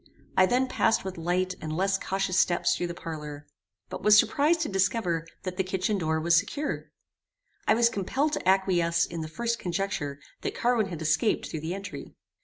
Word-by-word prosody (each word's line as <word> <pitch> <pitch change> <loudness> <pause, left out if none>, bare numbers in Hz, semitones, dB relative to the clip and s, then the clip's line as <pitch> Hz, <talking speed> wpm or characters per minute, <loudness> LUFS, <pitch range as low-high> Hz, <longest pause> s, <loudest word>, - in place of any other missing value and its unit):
I 185 - +5
then 255 +3 +2
passed 225 -5 +1
with 190 -3 -5
light 180 +2 0
and 155 0 -4
less 195 +1 +1
cautious 195 -1 -1
steps 175 -2 +2
through 175 - -2
the 170 - -6
parlour, 150 -3 -7 0.4
but - - -7
was 210 0 +7
surprized 315 +8 +3
to 310 - 0
discover 190 -4 0 0.2
that 185 -1 -5
the 190 - +2
kitchen 190 +2 -1
door 160 -2 0
was 165 +1 +3
secure. 245 - -1 0.8
I - - +5
was 235 +1 +5
compelled 260 +9 -1
to 185 - 0
acquiesce 180 -3 +3
in 170 -1 -6
the 155 - -4
first 235 +7 -2
conjecture 175 -6 -3 0.2
that - - -3
Carwin 235 -4 +2
had 170 -4 -6
escaped 155 +8 +1
through 155 - -4
the 165 +4 -3
entry. 200 0 -8
185 Hz, 190 wpm, -27 LUFS, 165-210 Hz, 0.8 s, was